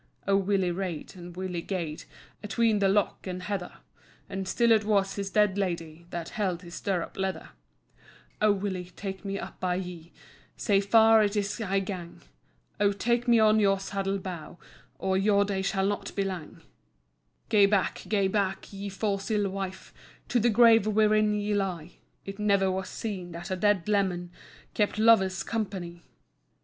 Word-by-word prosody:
O 195 - +4
Willie 195 -2 +1
rade, 180 -2 -5
and 175 -1 -10
Willie 185 -2 -3
gaed 170 -4 -4 0.4
Atween 220 0 +1
the 200 - +3
[loch 200 +1 +1
and 185 0 -5
heather], 190 -3 -4 0.5
And 195 -1 -5
still 235 +4 +2
it 220 -1 +5
was 200 -2 +1
his 200 -1 -4
dead 205 -1 +2
Lady 170 -3 -3
That 170 -1 -5
[held 185 -4 -2
his 170 -1 -11
stirrup 185 -3 -3
leather]. 190 0 -3 0.9
"O 215 0 +5
Willie, 190 -3 -3
tak' 190 -2 -6
me 195 0 -3
up - - -8
by 180 -1 0
ye, 180 -2 -6 0.5
Sae 200 -3 +2
far 220 +2 +6
it 205 0 +1
is 205 +2 -2
I 195 -2 0
gang; 185 -3 -7 0.6
O 205 -1 +4
tak' 235 +4 0
me 235 -1 +6
on 215 0 +5
your 195 -2 +3
saddle 195 0 -2
bow, 175 -4 -7 0.4
Or 190 0 0
[your 200 0 +3
day 195 -1 -2
shall 190 0 0
not 205 +1 -3
be 200 - +1
lang]." 180 -3 -6 0.9
"Gae 205 -3 +6
back, 200 -2 0
gae 200 -3 +2
back, 195 0 -2
ye 200 +1 -5
fause 195 +1 -2
ill 205 -3 +1
wife, 190 -1 -6 0.4
To 245 - +2
the 235 +2 +3
grave 225 -1 +6
wherein 215 0 +3
ye 210 0 -1
lie, 180 -5 -2 0.3
It 195 +1 -7
never 200 -2 +2
was 190 0 -3
seen 185 -6 -5
that 170 +2 -7
a - - +1
dead 200 -1 +1
leman 185 -4 0 0.4
Kept 210 -1 0
lover's 215 -4 +4
company! 185 -6 -4
195 Hz, 170 wpm, -28 LUFS, 185-210 Hz, 0.9 s, far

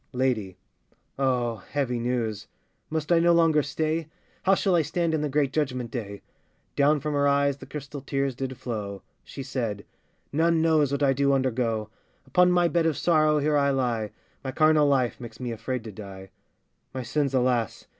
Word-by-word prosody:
LADY. 120 -7 -1 0.6
Oh! 125 -4 +1
heavy 125 +4 -2
news! 115 -4 -2 0.4
must 155 0 -2
I 170 - +6
no 170 +1 +4
longer 165 -2 +4
stay? 155 +2 -2 0.3
How 195 +1 +4
shall 190 -1 +1
I 170 - +4
stand 170 +1 -1
in 155 - 0
the 150 - -1
great 140 -1 +1
judgment 130 -6 -1
day? 100 -4 -6 0.5
[Down 145 +1 +3
from 150 +2 -3
her 145 0 +2
eyes 140 0 +2
the - - -12
crystal 145 -1 -7
tears 135 0 -1
did 130 0 -5
flow: 105 -6 -5 0.2
She 135 - -8
said], 115 -7 -3 0.5
None 165 +2 +3
knows 160 -3 +3
what 140 +1 0
I 135 -1 +4
do 140 +1 +2
undergo: 120 -5 0 0.3
Upon 180 +6 +4
my 175 -1 +4
bed 170 0 +1
of 160 - 0
sorrow 155 -3 +3
here 150 +1 +1
I 140 0 +3
lie; 120 -5 0 0.3
My 135 - -3
carnal 155 +1 +4
life 130 -3 +1
makes 115 -1 -9
me 125 -2 -3
afraid 115 +2 -4
to 110 - -7
die. 95 -2 -10 0.6
My 130 - -3
sins, 135 +2 -1
alas! 125 -4 0
135 Hz, 180 wpm, -26 LUFS, 120-150 Hz, 0.6 s, I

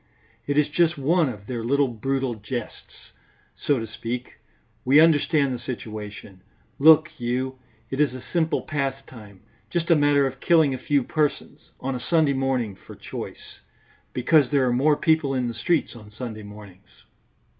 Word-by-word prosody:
It 145 0 0
is 150 - +4
just 170 +2 +1
one 155 +2 +2
of 105 -5 -9
their 120 0 -4
little 140 +4 +2
brutal 130 +2 -2
jests, 110 +2 -8 0.4
so 145 - 0
to 115 - -3
speak; 115 +3 -6 0.4
we 135 +4 +5
understand 150 -3 +3
the 125 - -5
situation, 105 -5 -8 0.4
look 155 +1 +6
you; 130 +2 -2 0.3
it 135 - -3
is 150 -4 +3
a 130 - -9
simple 160 -2 +1
pastime, 135 -8 -5 0.3
just 170 0 -1
a - - +7
matter 145 -1 +3
of 135 0 -4
killing 160 -4 +3
a 130 - -4
few 140 +1 +1
persons, 150 +2 -2
on 135 +1 -3
a 125 - -4
Sunday 155 +1 +2
morning 130 -5 -1
for - - -14
choice, - - -9 0.5
because 140 +2 +3
there 140 -3 +2
are 120 - +1
more 145 +4 +3
people 160 -4 +1
in 125 -1 0
the 120 - -4
streets 130 +5 0
on 105 -3 -12
Sunday 110 -1 -7
mornings. 105 -2 -14
135 Hz, 165 wpm, -24 LUFS, 120-150 Hz, 0.5 s, a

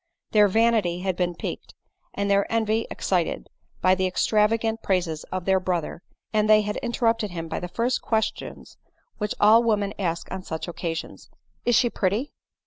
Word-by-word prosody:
Their 210 -1 +6
vanity 210 -4 +2
had 190 -1 -1
been 175 -1 -1
piqued, - - -6 0.4
and 200 0 -1
their 200 0 +2
envy 225 0 +1
excited, 180 -3 -1 0.3
by 185 - +5
the 185 0 +1
extravagant 220 +4 +1
praises 175 -5 -1
of 185 -1 -5
their 190 -1 +3
brother; 175 -3 -2 0.3
and 215 0 +2
jhey 215 0 +6
had 210 0 -3
interrupted 230 -3 0
him 165 -2 -5
by - - -3
the 180 - -5
first 235 +7 -1
questions 220 -2 -3 0.4
which 210 -1 -2
all 220 +2 +7
women 210 -3 0
ask 170 -3 -2
on 190 - -4
such 160 -2 -5
occasions 165 -1 -5
— - - -45
" - - -43
Is 240 -2 +5
die 240 - +2
pretty?" 215 +7 -1
200 Hz, 175 wpm, -25 LUFS, 180-225 Hz, 0.4 s, all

